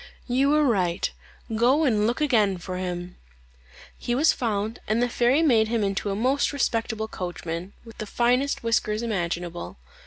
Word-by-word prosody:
"You 265 +3 +2
are 305 - +4
right; 185 -10 +1 0.4
go 255 +7 +3
and 215 -7 +2
look 240 +6 -1
again 215 -10 +3
for 180 +1 -6
him." 180 -1 -5 0.8
He 240 - -1
was 300 +5 +4
found, 220 -1 -2
and 220 +2 +1
the 245 - +2
fairy 245 +6 +2
made 230 -8 +4
him 225 -1 0
into 200 +1 -1
a 195 - -1
most 255 +6 +1
respectable 225 -5 -1
coachman, 175 -1 -5
with 230 - -14
the 215 - -4
finest 250 +5 +1
whiskers 225 -1 0
imaginable. 175 - -3
220 Hz, 160 wpm, -25 LUFS, 190-245 Hz, 0.8 s, are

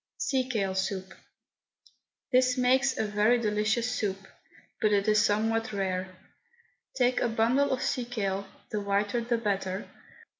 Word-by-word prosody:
SEA 260 -2 0
KALE 200 -6 -1
SOUP. 190 0 -3 1.2
This 255 0 +3
makes 260 +1 +3
a - - 0
very 210 +3 +3
delicious 220 +2 0
soup, 205 -5 -1 0.6
but 215 -2 +3
it 200 0 +2
is 215 0 +4
somewhat 225 +1 +1
rare. 190 -2 -1 0.9
Take 250 -1 +2
a 240 - +1
bundle 235 +5 +2
of 260 -1 -1
sea 250 - -1
kale, 200 -5 -3 0.2
the 210 -2 -1
whiter 205 +3 0
the 235 0 0
better. 195 -3 -2
220 Hz, 140 wpm, -28 LUFS, 200-245 Hz, 1.2 s, is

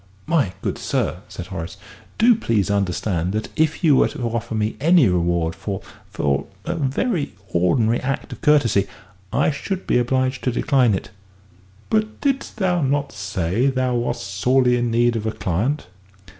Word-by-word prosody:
'" 95 - -30
"My 130 - +2
good - - -2
sir," - - -1
said 90 - -7
Horace, 80 -3 -5 0.4
"do 235 +2 +6
please 115 - 0
understand 95 -2 0
that 110 +1 -2
if 160 +2 +1
you 150 -4 +6
were - - +5
to 140 -4 -6
offer 115 0 -3
me 110 0 -1
any 165 -3 +5
reward 85 -2 +1
for 100 +1 -5 0.3
for 70 -1 -1 0.2
a - - -1
very 150 - -1 0.2
ordinary 110 +7 +2
act 135 +1 -3
of - - -11
courtesy, 145 -10 +3 0.4
I - - +2
should 190 +6 -4
be - - +2
obliged 130 +1 0
to 125 - +2
decline 125 -3 +2
it." - - -6 0.8
"But 215 0 0
didst 275 -5 -1
thou 180 -4 +1
not 140 +1 0
say 95 +4 -1
that 135 - 0
thou 130 -1 +1
wast 120 0 -1
sorely 125 +6 +2
in 120 -1 0
need 120 +1 +2
of 110 -1 -2
a - - 0
client?" 110 - -1
120 Hz, 170 wpm, -22 LUFS, 100-145 Hz, 0.8 s, do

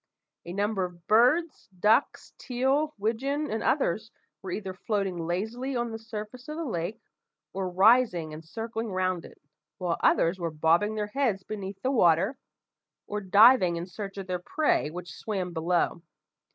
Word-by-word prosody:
A 175 - -6
number 200 0 0
of 175 -1 -7
birds, 255 +10 +3
ducks, 220 +8 +2
teal, 270 +4 0
widgeon, 270 +8 -1
and 220 0 -2
others, 220 - 0 0.3
were 190 - -7
either 190 0 -4
floating 185 -4 -2
lazily 225 +9 -2
on 240 -1 -1
the 225 - -5
surface 225 +3 -8
of 305 +1 -5
the 330 - -3
lake, 185 - -3 0.5
or 190 -1 -2
rising 190 -4 +4
and 155 +1 -8
circling 225 +5 -5
round 185 -2 -1
it, - - -15 0.4
while 175 -2 -1
others 170 +3 +3
were 170 -1 -1
bobbing 165 +7 +2
their 210 -1 -1
heads 235 -9 0
beneath 195 -2 -6
the 260 - +1
water, 190 - +3 0.7
or 210 0 -4
diving 200 -1 +6
in 170 +1 -4
search 195 +1 -7
of 195 - -5
their 180 -1 -2
prey 295 - +1
which 175 +2 -8
swam 190 -5 -4
below. 170 +1 0
205 Hz, 160 wpm, -28 LUFS, 180-235 Hz, 0.7 s, diving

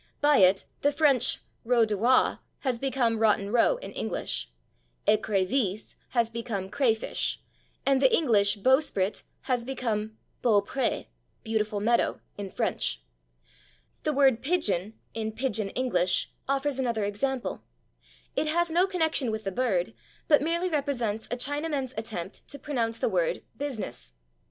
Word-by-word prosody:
By 290 0 +4
it 190 0 +5 0.2
the 285 - +3
French 275 -4 +3 0.2
/route 235 -1 +4
de 215 -1 -1
roi/ 240 +6 +3 0.2
has 255 -4 -1
become 250 -4 +1
/Rotten 210 -1 +2
Row/ 245 - +4
in - - -8
English, 60 - -3 0.6
/écrevisse/ 210 0 +1 0.2
has 235 -2 +2
become 225 -4 -4
/crayfish/, 230 -5 0 0.5
and 270 -1 +3
the 265 - +5
English 210 -9 +3
/bowsprit/ 220 -4 +2 0.2
has 250 -3 -1
become 220 -4 -3 0.3
/beau 205 -4 +4
pré/ 265 +1 -1 0.4
(=/beautiful 215 -2 -1
meadow/) 235 +2 +2 0.2
in 200 -1 -6
French. 60 - -2 1.0
The 305 - 0
word 270 -4 +4
/pigeon/, 220 - 0 0.2
in 220 -1 -3
/Pigeon 220 -5 -1
English/, 185 -9 +1 0.2
offers 275 0 0
another 235 -4 0
example; 240 +6 -2 0.7
it 310 - 0
has 340 +2 +1
no 355 +3 +3
connection 320 -8 +1
with 220 0 -3
the 195 - -2
bird, 200 -3 0 0.3
but 295 -3 +5
merely 340 +4 0
represents 245 -8 -1
a 245 - -2
Chinaman's 285 -1 -2
attempt 215 -4 -6
to 285 - -6
pronounce 235 -7 -2
the - - 0
word - - 0
/business 220 - -5
235 Hz, 135 wpm, -28 LUFS, 210-275 Hz, 1.0 s, it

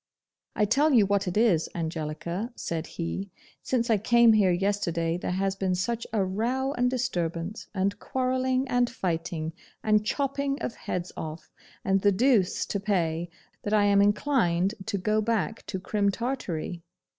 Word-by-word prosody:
'I 210 - +3
tell 290 +8 +3
you 220 -5 +6
what 200 -1 +1
it 180 - -1
is, 200 -8 +3
Angelica,' 170 +6 -3
said 165 -1 -4
he, 190 +3 -4 0.3
'since 240 -2 0
I 215 - +4
came 235 +2 +5
here 205 -3 +4
yesterday, 175 -3 0
there 180 - -3
has 190 +1 0
been 190 -1 0
such 230 +6 -2
a 210 -3 +1
row, 245 +8 -1
and 245 -1 +1
disturbance, 180 -6 -2
and 195 +1 0
quarrelling, 260 0 0
and 245 -1 +2
fighting, 165 -6 -3 0.3
and 215 -1 +3
chopping 275 +4 -1
of - - -3
heads 180 0 -4
off, 160 0 -7 0.3
and 195 0 +2
the 205 - +4
deuce 215 -2 +2
to 200 - -2
pay, 175 -4 0 0.3
that 205 - -3
I 210 -1 +4
am 200 0 +5
inclined 205 -4 +2
to 215 -2 -1
go 215 +3 +1
back 225 0 -1
to 190 - -3
Crim 200 +1 0
Tartary. 195 -7 -3
200 Hz, 160 wpm, -27 LUFS, 180-235 Hz, 0.3 s, you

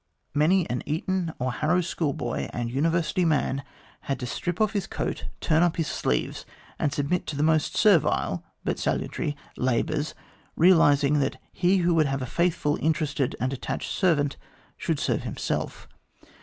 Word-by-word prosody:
Many 165 +5 +3
an 125 - -2
Eton 170 +3 -1
or 125 0 -1
Harrow 160 +7 +2
schoolboy 145 -8 -2
and 120 -1 -3
University 165 +6 +1
man 145 -4 +1 0.5
had 135 -2 0
to - - -2
strip 170 +9 -3
off 215 -1 +2
his 200 -3 -1
coat, - - -3
turn 160 0 +2
up 175 -2 +3
his 165 - +1
sleeves, - - -1 0.4
and 150 - +1
submit 145 +6 -1
to 150 - -3
the 145 - 0
most 155 -1 +2
servile 200 -8 +3 0.2
but - - -1
salutary 145 -1 -1 0.2
labours, 145 +5 0 0.4
realising 150 -4 +5
that 135 -1 -1
he 185 +2 +3
who 175 - +4
would 160 -3 +3
have 135 -1 -2
a - - -2
faithful, 160 0 0
interested, 150 -4 0
and 130 +3 -1
attached 135 - -4
servant 145 -7 +2 0.4
should - - -1
serve - - 0
himself. - - -3
155 Hz, 155 wpm, -26 LUFS, 140-170 Hz, 0.5 s, realising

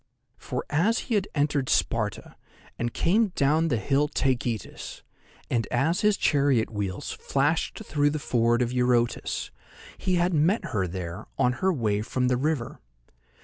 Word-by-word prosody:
For, 125 - -4
as 190 +11 +2 0.2
he 205 - +4
entered 145 -3 +1
Sparta, - - -1 0.4
and 120 0 -1
came 210 - +2
down 155 +4 +2
the 125 -7 +1
hill 140 +7 +1
Taygetus, 120 -7 -2 0.4
and 115 -2 0
as 145 +9 +1
his 210 -1 +3
chariot 140 -6 +2
wheels 100 -4 -3
flashed 150 +9 -1
through 145 -4 +2
the 155 - -2
ford 120 -3 +2
of 120 +1 -3
Eurotas, 125 -1 0 0.5
he 185 -1 0
had 175 +1 +2
met 165 +9 +2
her 95 -4 -1
there 90 +2 -6
on 125 - +3
her 190 0 +3
way 110 - 0
from 125 +3 -1
the 125 - +2
river. 145 -3 -2
135 Hz, 145 wpm, -26 LUFS, 120-160 Hz, 0.5 s, he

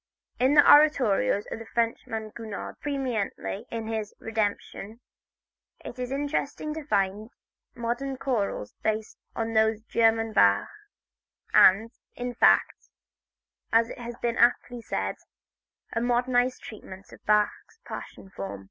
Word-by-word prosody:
In 260 +4 +3
the 290 - +7
oratorios 265 -9 +5
of - - -4
the 225 - -10
Frenchman 225 -2 -2
Gounod, 220 -3 -7
preeminently 245 - -3
in 230 -1 -4
his 220 -2 -4
"Redemption," 220 0 -3 0.9
it 255 - -8
is 250 0 -4
interesting 290 +2 -2
to 315 0 -6
find 200 -3 0 0.5
modern 245 +3 -3
chorals 210 - -2
based 220 0 -2 0.2
on 225 0 -2
those 220 0 +3
of - - -39
the - - -37
German 225 -1 +2
Bach, 100 - +4 0.8
and, 220 +5 +6 0.2
in 245 0 -4
fact, - - +3 0.8
as 230 +1 +3
it - - -9
has 240 0 -6
been 235 0 0
aptly 240 0 +2
said, - - -3 0.8
a 230 - 0
modernized 245 +1 +1
treatment 195 -3 -11
of - - -15
Bach's 210 - +1
passion 190 - -9
form. 100 - -6
230 Hz, 130 wpm, -27 LUFS, 215-245 Hz, 0.9 s, the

